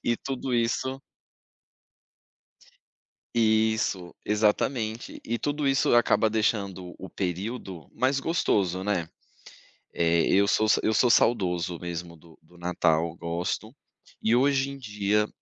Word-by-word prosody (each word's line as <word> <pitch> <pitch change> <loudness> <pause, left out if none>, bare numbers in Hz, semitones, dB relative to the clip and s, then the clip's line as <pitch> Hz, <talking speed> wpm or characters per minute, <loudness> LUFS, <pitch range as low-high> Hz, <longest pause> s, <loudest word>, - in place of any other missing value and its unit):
e 120 - +1
tudo 135 0 -4
isso 130 +3 0 2.3
Isso, 110 -5 +1
exatamente, 110 +2 0
e 115 +1 -2
tudo 145 0 -2
isso 135 -3 +3
acaba 120 -1 +4
deixando 100 -5 -1
o 95 - -8
período 95 -1 -5
mais 135 +2 +1
gostoso, 100 - 0
né. 95 -5 -1 0.9
Eh, 85 -1 +2
eu 100 +1 +4
sou 110 +1 +2
eu 110 - +1
sou 125 +1 +4
saudoso 90 -8 +2
mesmo 85 -1 -6
do 80 +1 -19
do 85 +2 -21
Natal, 85 -2 +1
eu 80 - -11
gosto, 85 +8 -4 0.4
e 110 +2 +2
hoje 135 +1 +2
em 140 - -8
dia 105 -2 0
105 Hz, 120 wpm, -26 LUFS, 90-120 Hz, 2.3 s, acaba